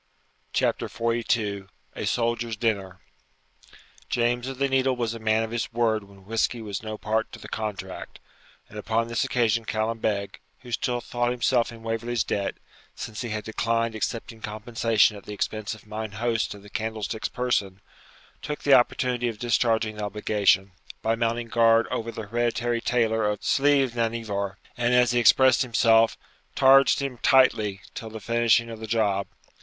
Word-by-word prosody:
CHAPTER - - 0
XLII 115 -4 -1 0.3
A - - -3
SOLDIER'S 115 -1 0
DINNER 100 -5 -2 1.1
James 120 +1 0
of 135 -1 -5
the 140 +1 +1
Needle 135 -1 +2
was 120 -2 -2
a 115 - -7
man 110 0 +2
of 110 - -5
his 115 0 -2
word 110 -3 +1
when 100 -1 -18
whisky 115 +3 0
was 105 -3 -5
no 110 -1 -5
party 110 +1 -1
to - - -7
the - - -10
contract; 95 -4 -6 0.5
and 105 - -9
upon 115 +2 -1
this 115 -2 0
occasion 115 -2 +1
Callum 110 +1 -2
Beg, 100 -2 -2 0.2
who 125 -1 -11
still 120 +1 -1
thought 120 0 -1
himself 120 0 +1
in 115 -1 -12
Waverley's 115 0 -1
debt, 100 -1 -2 0.4
since 110 -2 -6
he 120 - -4
had 110 0 -3
declined 115 +1 -1
accepting 115 +1 -4
compensation 110 0 +1
at 100 - -13
the 105 - -5
expense 110 +1 -3
of 110 - -17
mine 110 0 -5
host 115 0 -1
of 100 - -14
the 105 - -13
Candlestick's 110 0 -3
person, 105 -6 -1 0.6
took 150 0 -5
the 140 - +5
opportunity 125 -1 +3
of 115 -2 -4
discharging 115 -1 +1
the 105 - -4
obligation, 100 -1 +1 0.3
by 110 - +2
mounting 115 +1 -1
guard 115 0 +4
over 115 0 -2
the 110 - -6
hereditary 120 +1 -1
tailor 115 -3 +1
of 105 -1 -3
Sliochd 140 -3 +3
nan 115 -1 0
Ivor; 100 -3 -3 0.2
and, 120 0 +1
as 125 -1 +4
he 120 - +2
expressed 130 +3 +5
himself, 115 -2 +4 0.4
'targed 135 +1 +6
him 130 -3 -4
tightly' 110 -7 +3
till 110 - -7
the 110 0 -8
finishing 115 +1 +2
of 110 - -8
the 110 - -6
job. 105 -3 +1
115 Hz, 170 wpm, -25 LUFS, 110-120 Hz, 1.1 s, targed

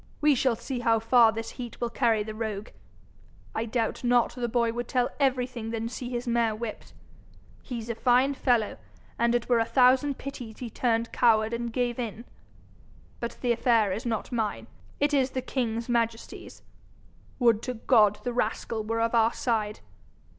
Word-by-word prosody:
We 300 0 +4
shall 255 -2 +2
see 255 +3 -5
how 230 -1 +3
far 230 0 +5
this 225 +1 -5
heat 240 -2 -8
will 235 -1 -2
carry 230 -3 +2
the 215 +1 -6
rogue! 215 -1 -4 0.8
I 225 - -2
doubt 230 +1 -2
not 245 -1 +3
the 245 -2 -2
boy 235 -1 +1
would 240 0 -4
tell 250 -1 0
everything 250 -4 0
than 225 0 -3
see 245 0 -6
his 245 0 -4
mare 230 -2 +1
whipped. 220 0 -7 0.7
He's 235 -3 -6
a 235 - -2
fine 250 +4 +3
fellow, 240 -5 +1 0.4
and 235 +1 +3
it 240 - -1
were 240 -2 +3
a - - +3
thousand 260 +3 +3
pities 245 -5 -8
he 240 -3 -6
turned 230 -1 0
coward 220 -2 +3
and 235 0 -3
gave 245 0 -1
in. 230 0 -5 0.9
But 235 - -5
the 245 - +1
affair 230 -4 +3
is 205 +5 -3
not 230 0 -3
mine; 225 -3 -2 0.3
it 290 +1 +1
is 270 -2 +3
the 260 - -3
king's 230 -3 -2
majesty's. 230 -2 -3 0.7
Would 235 -4 +3
to 250 0 -4
God 210 -3 +3
the 245 - -2
rascal 225 -1 -2
were 225 +1 -1
of 230 +1 0
our 230 -1 +4
side! 215 -4 -1
235 Hz, 175 wpm, -27 LUFS, 225-245 Hz, 0.9 s, far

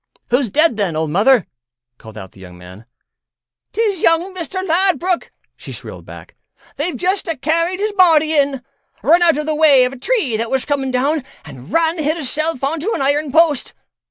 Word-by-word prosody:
"Who's 250 -1 +1
dead, 305 +1 +2
then, 195 -6 -1
old 155 -1 -2
Mother?" 215 - +3 0.5
called 110 -1 -13
out 95 -3 -9
the - - -19
young 90 -1 -12
man. 90 +6 -14 0.8
"'Tis 420 -6 -1
young 335 +3 +2
Mister 370 +1 -5
Ladbruk," 365 0 0 0.2
she - - -11
shrilled - - -10
back; - - -12 0.4
"they've 330 +5 -2
just 375 +2 -1
a 330 -3 -3
carried 335 +6 -1
his 425 +1 -1
body 320 -5 +4
in. 280 -3 +1 0.4
Run 335 +4 +4
out 335 -3 +4
of 300 - -3
the 310 - -1
way 295 -4 +5
of 250 - -3
a 270 - -11
tree 330 - 0
that 230 +1 -3
was 265 -1 -1
coming 275 -2 -1
down 275 +4 0 0.2
an' 135 -1 -12
ran 330 - +1
hisself 310 -1 -2
on 305 +4 -1
to 385 +9 -2
an - - -3
iron 285 +1 0
post. 315 -3 +2
300 Hz, 185 wpm, -17 LUFS, 250-335 Hz, 0.8 s, way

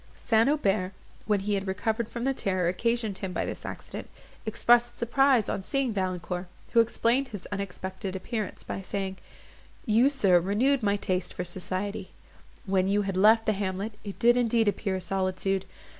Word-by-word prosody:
St. 225 +2 +3
Aubert, 200 -10 +1 0.3
when 205 -2 +2
he 205 +1 -1
had 195 -1 -1
recovered 220 +4 -1
from 235 - -5
the 270 +1 +2
terror 185 -7 0
occasioned 225 +2 -1
him 190 -2 -4
by - - -1
this - - -5
accident, - - -7 0.4
expressed 240 +2 +3
surprise 255 -1 +3
on - - -2
seeing 265 +3 -1
Valancourt, 185 -2 -2 0.3
who 235 - +6
explained 235 +3 +2
his 205 -6 -8
unexpected 190 -1 -4
appearance 215 +2 -4
by - - -5
saying, 195 0 -3 0.7
"You, 235 +3 +4
sir, 200 -11 +4
renewed 235 +10 +2
my 205 -2 +2
taste 185 -3 -2
for 180 - -2
society; 185 +3 -4 0.5
when 190 -1 +2
you 205 +1 +2
had 195 -1 -3
left 220 +4 +5
the 215 - +2
hamlet, 195 +2 -3
it 200 -2 -7
did 240 +1 +5
indeed 230 -2 +2
appear 200 -1 0
a 185 - -3
solitude. 190 +1 -1
205 Hz, 170 wpm, -28 LUFS, 190-230 Hz, 0.7 s, who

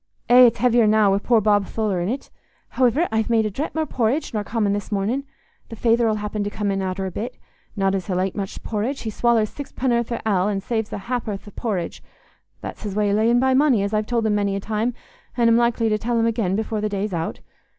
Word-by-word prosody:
Eh! 250 0 +9
It's 235 - 0
heavier 240 -1 +3
now, 210 -2 +4
wi' 195 - +2
poor 230 +2 +3
Bob 205 -1 +2
Tholer 210 -5 -1
in't. 230 +10 -3 0.4
Howiver, 260 +7 +2
I've 220 0 0
made 225 -2 +3
a 215 - -2
drap 285 +11 -4
more 320 0 0
porridge 260 +2 -1
nor 210 -2 -1
common 210 -1 0
this 205 +2 -4
mornin'. 215 +8 -1 0.4
The 225 - -7
feyther 230 +1 +2
'ull 215 - +1
happen 210 0 -3
come 205 -1 -2
in 195 0 -1
arter 190 0 -2
a 190 - -4
bit. 240 +7 -5 0.4
Not 195 -2 +1
as 190 -2 -2
he'll 185 -2 -1
ate 190 0 -1
much 195 -2 -5
porridge. 230 +6 -2
He 220 - -4
swallers 225 -1 +2
sixpenn'orth 245 -4 -2
o' 235 - -1
ale, 190 -2 +2
an' 200 -2 -1
saves 220 +1 -2
a - - -3
hap'orth 215 -2 -4
o' - - -9
por 225 -2 -2
ridge—that's 175 -2 -9
his 205 -3 -5
way 210 -1 +1
o' - - +1
layin' 230 +3 +3
by 260 +1 +3
money, 260 -6 +3
as 200 +1 -2
I've 215 0 0
told 235 -2 0
him 215 - +2
many 200 -1 0
a - - -2
time, 220 +4 -2 0.4
an' 235 -1 +4
am 230 - +5
likely 235 -1 +2
to 215 0 +1
tell 235 +2 0
him 225 - +2
again 215 -5 0
afore 220 -1 -2
the 215 - -1
day's 200 0 -2
out. 165 -1 -3
220 Hz, 240 wpm, -22 LUFS, 200-235 Hz, 0.4 s, Eh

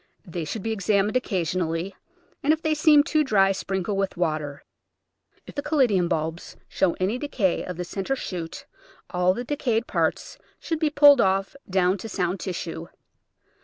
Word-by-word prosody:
They 170 -2 -5
should 190 +6 -5
be 225 - -2
examined 205 +1 +1
occasionally, 180 - -1 0.5
and 290 - +3
if 320 - -4
they 315 -1 +2
seem 300 -1 +5
too 310 -1 +2
dry 195 -7 +3
sprinkle 195 +1 -2
with 195 -2 -2
water. 155 -4 -2 0.8
If - - -11
the 285 - -3
Caladium 255 - +2
bulbs 160 0 -3
show 180 -3 +1
any 200 +7 -1
decay 250 -11 0
of 180 -2 -6
the 180 - -3
centre 195 +8 -3
shoot 175 -9 -6 0.5
all 180 +1 +2
the 245 - -4
decayed 240 -4 -1
parts - - -2 0.2
should 325 -2 -3
be 310 -2 +2
pulled 285 -3 +7
off 195 +2 +1
down 185 +1 +2
to 225 - -7
sound 180 -1 -1
tissue. 170 -3 -5
195 Hz, 165 wpm, -25 LUFS, 180-255 Hz, 0.8 s, pulled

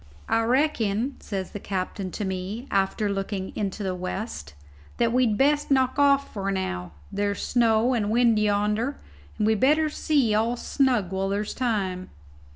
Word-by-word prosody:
"I 225 - +2
reckon," 245 -2 +1
says 190 -3 -5
the 205 - -6
captain 190 0 -3
to 210 - -3
me, 190 +6 -4
after 195 +2 +1
looking 195 -1 -3
into 205 0 -3
the 190 -1 -1
west, 180 - -5 0.4
"that 235 -1 +2
we'd 245 -4 +2
best 290 +3 +2
knock 260 0 +2
off 280 -2 +3
now. 190 - -3 0.2
There's 200 0 -1
snow 235 0 +3
and 210 -4 0
wind 230 -1 +3
yonder, 210 +5 +1 0.4
and 210 - +1
we'd 220 -1 +2
better 305 +4 +3
see 285 -7 +1
all 225 +3 +1
snug 245 -9 +1
while 190 0 -1
there's 205 +1 -2
time." 195 -7 -2
215 Hz, 155 wpm, -25 LUFS, 195-245 Hz, 0.4 s, off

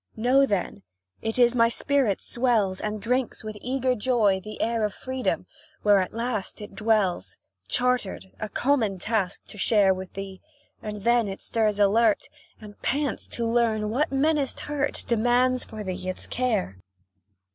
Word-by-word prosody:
Know, 255 +5 +4
then 190 - -2 0.4
it 225 +1 -2
is 240 -1 +5
my 230 -1 +4
spirit 260 -5 0
swells, 225 -7 +1
And 215 0 -3
drinks, 250 +3 -1
with 215 -1 -6
eager 260 0 0
joy, 215 -5 +2
the 215 0 -8
air 230 -1 0
Of 210 -2 -1
freedom 260 0 -2 0.4
where 205 -1 +5
at 185 - -1
last 230 -3 -3
it 210 0 -9
dwells, 195 - 0 0.3
Chartered, 245 - 0
a 215 - -4
common 235 -8 +1
task 200 -1 -2
to 210 - -10
share 200 -2 +4
With 185 0 -8
thee, 195 -1 -7 0.4
and 210 -2 -6
then 235 -1 +3
it 195 0 -5
stirs 215 -3 +1
alert, 210 +2 +3 0.3
And 210 -1 -13
pants 285 0 -1
to 235 - -3
learn 225 -2 +1
what 275 +6 0
menaced 285 0 +1
hurt 290 -1 -2
Demands 245 +2 +2
for 215 -1 -7
thee 185 -1 -4
its 185 - -4
care. 220 - -1
225 Hz, 155 wpm, -26 LUFS, 205-250 Hz, 0.4 s, is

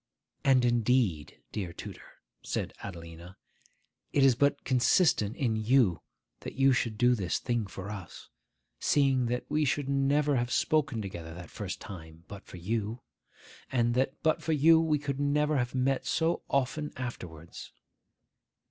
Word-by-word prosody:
'And 130 -2 +4
indeed, 120 - +1
dear 95 -5 -4
tutor,' - - -11 0.2
said - - -3
Adelina, 85 -1 -9 0.7
'it 140 - +3
is 135 -2 +6
but 140 +3 +1
consistent 125 - +3
in 120 -5 0
you 110 -4 +2 0.4
that - - -8
you 135 0 +4
should 115 -3 -1
do 125 +2 +4
this 95 -7 -1
thing 120 -4 -2
for 95 +1 -7
us, 100 -4 -9 0.5
seeing 135 -4 +2
that 125 +1 -2
we 155 0 +1
should 145 0 0
never 140 +1 +2
have 120 +1 -1
spoken 145 -8 +1
together 85 -4 -7
that 85 -1 -10
first 100 -3 -5
time 80 -3 -10
but 100 -1 -11
for - - -10
you, 110 +5 -3 0.7
and 120 -2 +2
that 130 +3 0
but 155 - +2
for 160 - 0
you 160 +2 +6
we 155 -2 +2
could 140 -1 -4
never 150 +1 +1
have 125 +1 -2
met 130 +1 +1
so 165 +1 +1
often 140 +3 -1
afterwards. 85 -10 -7
125 Hz, 150 wpm, -29 LUFS, 100-140 Hz, 0.7 s, is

